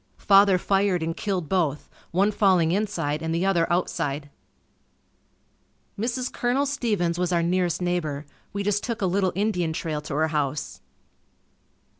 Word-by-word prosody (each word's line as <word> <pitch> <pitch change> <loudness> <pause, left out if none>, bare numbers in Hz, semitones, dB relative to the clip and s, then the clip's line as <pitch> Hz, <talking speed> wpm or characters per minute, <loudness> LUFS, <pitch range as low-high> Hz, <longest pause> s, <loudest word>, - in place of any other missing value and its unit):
Father 195 -1 +5
fired 195 -2 +1
and 165 0 -2
killed 185 -6 -2
both, 155 -6 0 0.2
one 195 +4 +2
falling 185 -6 +3
inside 170 -7 -1
and 160 0 -2
the 175 +3 0
other 175 -3 +2
outside. 145 -5 -1 1.6
Mrs. 245 +4 -2
Colonel 250 +4 +1
Stevens 210 -11 -1
was 180 0 0
our 170 -1 +2
nearest 180 0 0
neighbor. 155 -5 -2 0.3
We 200 0 -3
just 205 0 0
took 230 -4 -3
a - - +3
little 190 0 +1
Indian 180 -5 0
trail 155 -2 -3
to 150 -1 -5
her 160 +1 +1
house. 150 -2 -2
180 Hz, 145 wpm, -25 LUFS, 160-200 Hz, 1.6 s, Father